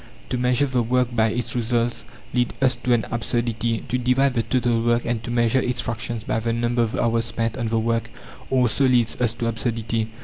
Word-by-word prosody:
To 125 Hz, -, -1 dB
measure 125 Hz, +2 st, +3 dB
the 130 Hz, -3 st, 0 dB
work 125 Hz, +1 st, 0 dB
by 110 Hz, -1 st, +4 dB
its 115 Hz, +1 st, -3 dB
results 120 Hz, -, 0 dB, 0.3 s
leads 125 Hz, -1 st, 0 dB
us 130 Hz, -2 st, +3 dB
to 120 Hz, +1 st, 0 dB
an 115 Hz, -2 st, +1 dB
absurdity; 115 Hz, 0 st, -1 dB
to 125 Hz, -, -1 dB
divide 125 Hz, +2 st, +2 dB
the 120 Hz, -, +1 dB
total 120 Hz, -1 st, +1 dB
work, 120 Hz, +1 st, +1 dB
and 115 Hz, -1 st, -2 dB
to -, -, -6 dB
measure 120 Hz, +2 st, +2 dB
its 125 Hz, -1 st, -1 dB
fractions 115 Hz, -1 st, -3 dB
by 110 Hz, -, -1 dB
the 115 Hz, +1 st, -1 dB
number 120 Hz, +1 st, 0 dB
of 115 Hz, -1 st, 0 dB
hours 115 Hz, -1 st, +1 dB
spent 115 Hz, -1 st, -2 dB
on 120 Hz, -3 st, -2 dB
the 115 Hz, +1 st, 0 dB
work 115 Hz, 0 st, 0 dB, 0.4 s
also 130 Hz, +1 st, +3 dB
leads 120 Hz, -2 st, +2 dB
us 120 Hz, -2 st, +2 dB
to 120 Hz, 0 st, -4 dB
absurdity. 115 Hz, 0 st, -1 dB
120 Hz, 210 wpm, -23 LUFS, 115-125 Hz, 0.4 s, by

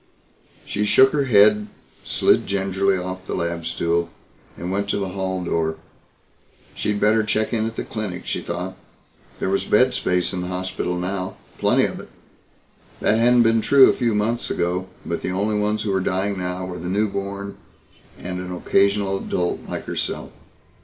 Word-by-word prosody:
She 105 Hz, -, -2 dB
shook 130 Hz, +6 st, +5 dB
her 145 Hz, -2 st, +1 dB
head, 105 Hz, -2 st, +5 dB, 0.4 s
slid -, -, +2 dB
gingerly 95 Hz, 0 st, +1 dB
off 90 Hz, +1 st, -6 dB
the -, -, -2 dB
lab 85 Hz, -1 st, -2 dB
stool 85 Hz, +1 st, 0 dB, 0.5 s
and 90 Hz, +2 st, -4 dB
went 100 Hz, +1 st, -1 dB
to -, -, +1 dB
the 100 Hz, -2 st, -2 dB
hall 95 Hz, -1 st, -3 dB
door. 80 Hz, -2 st, 0 dB, 1.0 s
She'd 105 Hz, -1 st, -1 dB
better 110 Hz, +2 st, +4 dB
check 110 Hz, +2 st, 0 dB
in 110 Hz, -1 st, +1 dB
at 115 Hz, -, -6 dB
the -, -, -3 dB
clinic, 100 Hz, -5 st, -5 dB
she -, -, -2 dB
thought. 90 Hz, +2 st, -4 dB, 0.6 s
There 95 Hz, -, -1 dB
was 100 Hz, -, +1 dB
bed 125 Hz, +4 st, +3 dB
space 90 Hz, 0 st, 0 dB
in 90 Hz, -, -2 dB
the 90 Hz, -, -4 dB
hospital 90 Hz, -1 st, -3 dB
now. 95 Hz, +1 st, -3 dB, 0.2 s
Plenty -, -, +3 dB
of -, -, -4 dB
it. -, -, -11 dB, 0.9 s
That 110 Hz, -, +2 dB
hadn't 120 Hz, +1 st, +5 dB
been 115 Hz, 0 st, +3 dB
true 135 Hz, +3 st, +7 dB
a -, -, -2 dB
few 120 Hz, -4 st, 0 dB
months 115 Hz, +3 st, 0 dB
ago 90 Hz, +2 st, -1 dB, 0.2 s
but 85 Hz, -, -3 dB
the -, -, -2 dB
only 100 Hz, +4 st, 0 dB
ones 105 Hz, +1 st, 0 dB
who 105 Hz, -, -1 dB
were 95 Hz, -, +2 dB
dying 95 Hz, +2 st, -1 dB
now 90 Hz, 0 st, -3 dB
were 90 Hz, -1 st, -6 dB
the 90 Hz, +2 st, -5 dB
newborn 100 Hz, 0 st, -2 dB, 0.6 s
and 90 Hz, 0 st, -5 dB
an 90 Hz, 0 st, -6 dB
occasional 100 Hz, +2 st, +2 dB
adult 90 Hz, -2 st, -2 dB
like -, -, -4 dB
herself. -, -, -3 dB
95 Hz, 175 wpm, -22 LUFS, 90-105 Hz, 1.0 s, true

